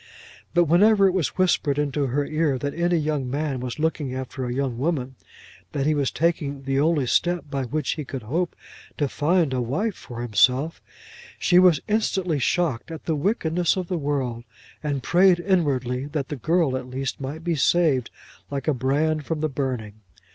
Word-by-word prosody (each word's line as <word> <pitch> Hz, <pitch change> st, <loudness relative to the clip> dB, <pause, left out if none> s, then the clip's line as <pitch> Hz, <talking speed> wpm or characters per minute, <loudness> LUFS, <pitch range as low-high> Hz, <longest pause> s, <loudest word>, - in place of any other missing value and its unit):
But 175 Hz, -, +6 dB
whenever 200 Hz, +5 st, +5 dB
it -, -, +3 dB
was 185 Hz, -6 st, -1 dB
whispered 165 Hz, -6 st, +2 dB
into 145 Hz, -1 st, 0 dB
her 140 Hz, +3 st, 0 dB
ear 155 Hz, -2 st, 0 dB
that 140 Hz, +2 st, -3 dB
any 175 Hz, +1 st, +1 dB
young 150 Hz, -4 st, -1 dB
man 140 Hz, -1 st, -2 dB
was 125 Hz, -1 st, -5 dB
looking 150 Hz, -4 st, -1 dB
after 130 Hz, 0 st, -5 dB
a 120 Hz, -, -3 dB
young 130 Hz, -2 st, -2 dB
woman, 135 Hz, -3 st, -1 dB, 0.6 s
that 140 Hz, -1 st, -1 dB
he 155 Hz, -, +3 dB
was 145 Hz, -3 st, +1 dB
taking 150 Hz, -4 st, -1 dB
the 135 Hz, 0 st, 0 dB
only 150 Hz, -2 st, +2 dB
step 175 Hz, +3 st, 0 dB
by 135 Hz, -2 st, -1 dB
which 150 Hz, +3 st, -2 dB
he 155 Hz, -, -3 dB
could 135 Hz, -3 st, -6 dB
hope 165 Hz, +10 st, -2 dB, 0.4 s
to 145 Hz, -, +1 dB
find 155 Hz, +1 st, +1 dB
a 125 Hz, -, 0 dB
wife 185 Hz, -, -1 dB
for 120 Hz, -7 st, -8 dB
himself, 125 Hz, +7 st, +2 dB, 0.6 s
she 175 Hz, -, +4 dB
was 180 Hz, -5 st, +5 dB
instantly 190 Hz, -7 st, 0 dB
shocked 155 Hz, -3 st, 0 dB
at 160 Hz, -2 st, -8 dB
the 160 Hz, -, 0 dB
wickedness 175 Hz, 0 st, +1 dB
of 180 Hz, -2 st, -3 dB
the 180 Hz, -, 0 dB
world, 135 Hz, -5 st, -2 dB, 0.4 s
and 145 Hz, -4 st, -2 dB
prayed 180 Hz, +2 st, +4 dB
inwardly 140 Hz, -8 st, 0 dB
that 145 Hz, -3 st, -3 dB
the 150 Hz, -, -3 dB
girl 160 Hz, +1 st, +1 dB
at 130 Hz, -1 st, -4 dB
least 135 Hz, +2 st, -4 dB
might 145 Hz, +4 st, -5 dB
be 170 Hz, 0 st, 0 dB
saved 150 Hz, -4 st, +2 dB, 0.4 s
like 140 Hz, +1 st, -4 dB
a 155 Hz, -, +3 dB
brand 145 Hz, +4 st, 0 dB
from 160 Hz, -2 st, -2 dB
the 155 Hz, -, 0 dB
burning. 125 Hz, -6 st, -4 dB
145 Hz, 185 wpm, -24 LUFS, 130-170 Hz, 0.6 s, But